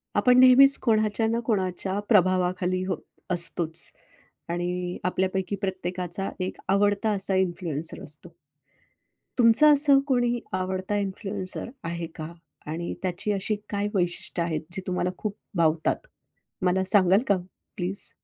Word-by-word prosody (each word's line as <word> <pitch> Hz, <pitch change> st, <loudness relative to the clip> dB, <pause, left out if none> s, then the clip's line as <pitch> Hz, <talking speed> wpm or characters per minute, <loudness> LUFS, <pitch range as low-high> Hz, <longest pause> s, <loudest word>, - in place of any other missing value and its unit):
आपण 250 Hz, +4 st, +3 dB
नेहमीच 265 Hz, +2 st, +7 dB
कोणाच्या 220 Hz, -1 st, +1 dB
ना 230 Hz, +1 st, -1 dB
कोणाच्या 190 Hz, -2 st, -2 dB
प्रभावाखाली 185 Hz, -2 st, +1 dB
हो, 190 Hz, -, -2 dB, 0.4 s
असतोच 170 Hz, -1 st, +6 dB, 0.6 s
आणि 175 Hz, +1 st, -3 dB
आपल्यापैकी 190 Hz, +2 st, -2 dB
प्रत्येकाचा 185 Hz, 0 st, -4 dB
एक 185 Hz, 0 st, -4 dB
आवडता 205 Hz, +2 st, +1 dB
असा 195 Hz, -1 st, +1 dB
इन्फ्लुएन्सर 170 Hz, -4 st, -2 dB
असतो. 150 Hz, 0 st, +1 dB, 1.1 s
तुमचं 245 Hz, +5 st, +5 dB
असं 285 Hz, -1 st, +5 dB
कोणी 245 Hz, -2 st, 0 dB
आवडता 185 Hz, +2 st, -3 dB
इन्फ्लुएन्सर 195 Hz, +1 st, -5 dB
आहे 170 Hz, 0 st, -5 dB
का 155 Hz, +1 st, -7 dB, 0.4 s
आणि 170 Hz, +2 st, -5 dB
त्याची 185 Hz, +2 st, -2 dB
अशी 200 Hz, +2 st, -2 dB
काय 205 Hz, 0 st, -2 dB
वैशिष्ट्य 175 Hz, -1 st, +1 dB
आहेत, 160 Hz, -2 st, -3 dB
जे 190 Hz, -, -2 dB
तुम्हाला 180 Hz, 0 st, -1 dB
खूप 210 Hz, -1 st, -5 dB, 0.2 s
भावतात? 165 Hz, -, 0 dB, 0.6 s
मला 185 Hz, +1 st, +1 dB
सांगाल 190 Hz, 0 st, +4 dB
का 200 Hz, -, +2 dB, 0.4 s
प्लीज? 190 Hz, +2 st, -2 dB
190 Hz, 120 wpm, -25 LUFS, 180-210 Hz, 1.1 s, नेहमीच